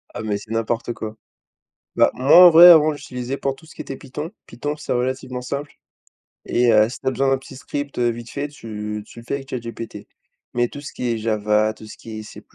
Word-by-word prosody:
Ah, - - -4
mais 105 -2 -1
c'est 105 +2 -12
n'importe 115 +1 -1
quoi. 110 0 -7 0.8
Bah - - +4
moi, 145 +8 +7
en 175 - +9
vrai, 170 +2 +10
avant 155 -2 +7
j'utilisais 130 -1 -5
pour 135 -1 -2
tout 160 - -18
ce 160 - -15
qui - - -7
était 135 - -7
Python. 145 +4 -7 0.2
Python, 145 +4 -4
c'est 150 - -6
relativement 125 0 -2
simple 140 +3 -5 0.7
et 120 0 +2
heu, 110 0 +5
si 125 - -8
tu 135 - -14
as - - +3
besoin 135 +2 0
d'un 135 - +2
petit 135 0 -13
script 145 0 -5
vite 120 -1 -1
fait, 140 +1 -3
tu 105 -6 -6
tu 115 - -15
le 115 - -11
fais - - -3
avec 135 -1 -6
ChatGPT, 115 -2 -6 0.5
mais 120 0 +1
tout 145 - -9
ce 145 - -9
qui 125 - -3
est 115 - -1
Java, 110 0 +1
tout 110 - -13
ce - - -10
qui 110 -1 -8
est - - -7
C+, 105 - -11
125 Hz, 235 wpm, -21 LUFS, 110-140 Hz, 0.8 s, vrai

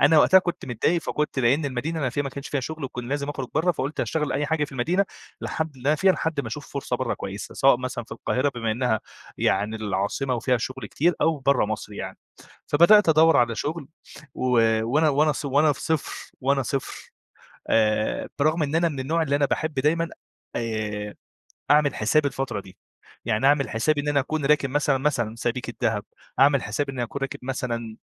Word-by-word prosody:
أنا 150 +2 +6
وقتها 190 +4 +7
كنت 175 -1 -3
متضايق 145 +8 +1
فكنت 150 -2 -2
لإن 135 +5 +3
المدينة 140 +5 -2
اللي 155 - -2
أنا 130 - 0
فيها 145 +3 -1
ما 140 - -3
كانش 140 +1 -7
فيها 140 - -1
شُغل 155 +1 -5
وكنت 125 -2 -5
لازم 140 +3 -3
اخرج 135 -3 -4
برّه، 165 +4 +2
فقُلت 145 -1 -3
هاشتغل 150 -2 -1
أي 145 +1 0
حاجة 160 -1 +1
في 145 - -11
المدينة 170 +10 +1 0.4
لحد 160 -3 -3
اللي 130 +3 -3
أنا 155 - +4
فيها 190 +2 +4
لحد 160 -4 -1
ما - - -7
اشوف 145 -1 -7
فرصة 140 - -2
برّه - - -1
كويسة، - - -7
سواء 135 -2 +5
مثلًا 125 -2 -4
في 110 - -11
القاهرة 130 +4 0
بما 115 -2 -1
إنّها 115 -2 0 0.4
يعني 110 +2 +1
العاصمة 110 +5 -1
وفيها 125 +2 +1
شُغل 130 +3 -5
كتير، 170 +4 +1
أو 160 -1 +2
برّه 135 -2 +2
مصر 110 -1 -5
يعني، - - -6 0.5
فبدأت 170 +5 +6
ادوّر 160 +1 +6
على 120 -1 +3
شُغل، 150 +4 -4 0.5
و - - -9 0.4
وأنا 150 +7 +3
وأنا 150 +2 +3
ص 145 - -6
وأنا 145 +2 +3
في 140 - -10
صفر 160 -3 -3
وأنا 135 +1 +2
صفر 130 +2 -4 0.6
آآ 110 -1 +1
برغم 155 +3 +2
إن 145 +1 -1
أنا 170 +1 +3
من 140 -4 -5
النوع 160 +5 0
اللي 140 -2 +1
أنا 145 - +2
باحب 155 +2 -2
دايمًا 160 +5 +1 0.5
آآ 105 -3 -3 0.6
اعمل 145 -2 +4
حساب 145 +8 +2
الفترة 135 -6 -3
دي، 95 -1 -15 0.5
يعني 110 +2 +1
اعمل 140 -4 +3
حسابي 145 +7 +1
إن 145 - -4
أنا 145 -1 +3
اكون 150 +1 -2
راكن 145 -2 +3
مثلًا، 145 -1 +2
مثلًا 130 -6 0
سبيكة 120 0 -3
دهب، 105 -2 +1 0.4
اعمل 140 -1 +5
حساب 135 +7 -2
إنّي 130 -3 -4
أكون 120 +4 -5
راكن 135 - -3
مثلًا 120 -4 -4
140 Hz, 200 wpm, -24 LUFS, 120-150 Hz, 0.6 s, وقتها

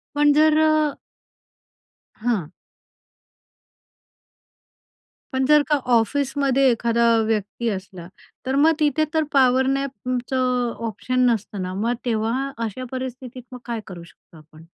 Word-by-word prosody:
पण 295 0 +4
जर 310 +1 +4
अ 315 0 +4 1.5
हां. 215 -9 -2 2.8
पण 260 0 +1
जर 300 +2 +5
का 300 - +4 0.2
ऑफिसमध्ये 270 +3 +2
एखादा 235 0 +1 0.2
व्यक्ती 220 +2 -2
असला, 190 -4 -7 0.4
तर 265 +1 -1
मग 305 +3 +5
तिथे 300 0 +2
तर 315 -1 +2
पॉवर 260 -1 +4
नॅपचं 255 -2 -1 0.2
ऑप्शन 255 +4 -1
नसतं 210 -3 -2
ना? 185 0 -4
मग 225 +5 -1
तेव्हा 235 +4 -1
अशा 255 +4 -6
परिस्थितीत 255 -1 -6
मग 250 - -8
काय 235 -2 -3
करू 175 -3 -9
शकतो 170 -1 -19
आपण? 155 +1 -17
250 Hz, 120 wpm, -22 LUFS, 220-270 Hz, 2.8 s, जर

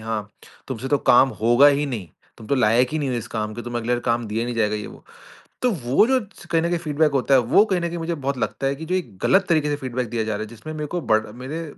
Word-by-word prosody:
"हाँ, 110 -1 -4 0.4
तुमसे 130 0 -4
तो 145 - +2
काम 130 +2 +6
होगा 120 +5 +6
ही 145 0 +3
नहीं, 110 -10 -5 0.3
तुम 110 - -11
तो 140 - +1
लायक 120 0 +3
ही 155 - 0
नहीं 145 -3 -1
हो 125 - -1
इस 115 -3 -4
काम 110 0 -3
के, 120 - -6
तुम 120 0 -5
अगले 120 +1 -2
बार 120 - 0
काम 115 0 0
दिया 110 +2 -2
ही - - -1
नहीं 120 - -3
जाएगा" 105 -1 +1
ये 105 - -6
वो। - - -13 0.6
तो 250 - +3
वो 140 - +2
जो 260 0 +2 0.3
कहीं 165 -1 +2
न 170 - 0
कहीं 175 - 0
फ़ीडबैक 155 -2 +1
होता 135 0 +2
है 130 - +6
वो 125 - +4
कहीं 185 -4 0
न 170 - -1
कहीं 170 0 -5
मुझे 165 +1 -2
बहुत 140 -3 -3
लगता 135 - -2
है 135 - +1
कि 160 - -7
जो 180 - -1
एक 145 - -3
गलत 190 -1 +3
तरीक़े 155 -3 +2
से 145 - 0
फ़ीडबैक 125 -3 -4
दिया 115 0 -2
जा 110 - -2
रहा 105 - -3
है, - - -5
जिसमें 120 +8 -9
मेरे 150 -1 -4
को 175 +4 -3
बर 110 -7 +1
मेरे 135 +8 -6
130 Hz, 300 wpm, -22 LUFS, 115-155 Hz, 0.6 s, काम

